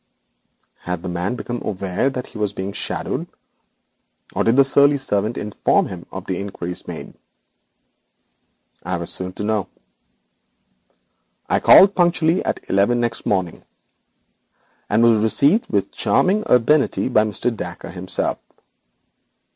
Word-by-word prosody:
Had 90 -1 -5
the - - -5
young - - -4
man 90 +6 -2
become 120 -1 -5
aware 100 +4 -1
that 130 -2 -5
he - - -11
was 105 -1 -1
being 95 0 -5
shadowed, - - -3 1.1
or - - 0
had 115 - +2
the 140 - +6
surly 140 +1 +4
servant 110 -4 -1
informed 105 0 0
him 90 -2 -9
of 95 0 -7
the 95 -2 -3
inquiries 90 -3 -6
made? - - -8 1.7
I 90 +1 -3
was 85 0 -2
soon 90 0 -3
to 105 - -6
know. 105 -3 -1 1.8
I - - +1
called 195 +1 +7
punctually 175 -1 +2
at - - -4
eleven 100 +5 +2
next 120 -1 -2
morning, 95 -4 -1 1.3
and 110 +3 +3
was 115 -2 +4
received 140 - +3
with 100 -2 0
charming 205 +4 +1
urbanity 135 +5 +3
by 120 -4 +3
Mr. 110 +3 -2
Dacre 90 -3 -7
himself. 95 0 -1
105 Hz, 135 wpm, -20 LUFS, 95-130 Hz, 1.8 s, called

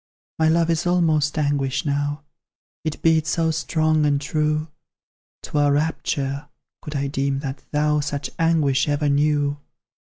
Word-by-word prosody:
My 160 0 +4
love 165 +1 +3
is 165 +1 0
almost 160 -4 +2
anguish 145 0 0
now, 145 +1 -1 0.6
It 155 -2 -4
beats 160 -1 +3
so 165 -1 +1
strong 155 -1 +1
and 145 -1 +2
true; 155 +1 -1 0.7
'Twere 145 -1 +1
rapture, 145 -2 -1 0.3
could 150 - -7
I 140 0 0
deem 135 0 -1
that 135 -1 -5
thou 150 0 +1
Such 145 -1 -3
anguish 155 -5 +2
ever 145 0 +1
knew. 145 0 +1
150 Hz, 140 wpm, -22 LUFS, 145-160 Hz, 0.7 s, My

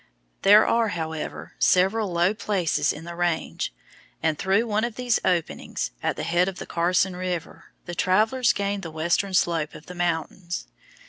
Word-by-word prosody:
There 210 +2 +7
are, 230 -1 +2
however, 160 -4 -5
several 195 +2 +3
low 175 +3 +2
places 195 -6 0
in 150 - -8
the 170 +1 -7
range, 175 -1 -1 0.5
and 160 -1 +2
through 195 +4 +2
one 215 -1 0
of 235 -2 -2
these 245 -3 +1
openings, 175 -3 -1
at - - 0
the - - -4
head 175 +3 +2
of 190 -1 -4
the - - -6
Carson 180 +2 +1
River, 180 -2 -4 0.2
the 175 - -6
travellers 220 +8 +3
gained 200 0 -2
the 170 - -6
western 170 +5 0
slope 165 -4 +1
of 150 - -11
the 180 - -9
mountains. 175 0 -2
180 Hz, 170 wpm, -25 LUFS, 170-205 Hz, 0.5 s, There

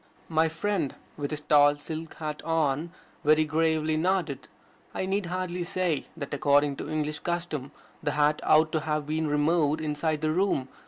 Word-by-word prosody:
My 160 0 +3
friend, 165 -2 -1 0.2
with 145 -1 -3
his 150 -1 -4
tall 145 -1 +5
silk 160 +2 -6
hat 155 -1 -5
on, 160 0 0 0.3
very 155 +1 +4
gravely 155 0 +1
nodded. 160 -6 0 0.5
I - - -1
need 195 0 -1
hardly 180 0 -3
say 175 -3 -1
that 140 -3 -5
according 145 0 +3
to - - -6
English 150 -1 -2
custom 170 -6 -3 0.3
the 145 - -1
hat 150 0 +2
ought 155 +1 +4
to 155 - +1
have 150 -1 -2
been 155 +1 -1
removed 150 +1 +2
inside 155 0 -1
the 155 0 +1
room. 160 -7 +1
155 Hz, 165 wpm, -27 LUFS, 150-165 Hz, 0.5 s, tall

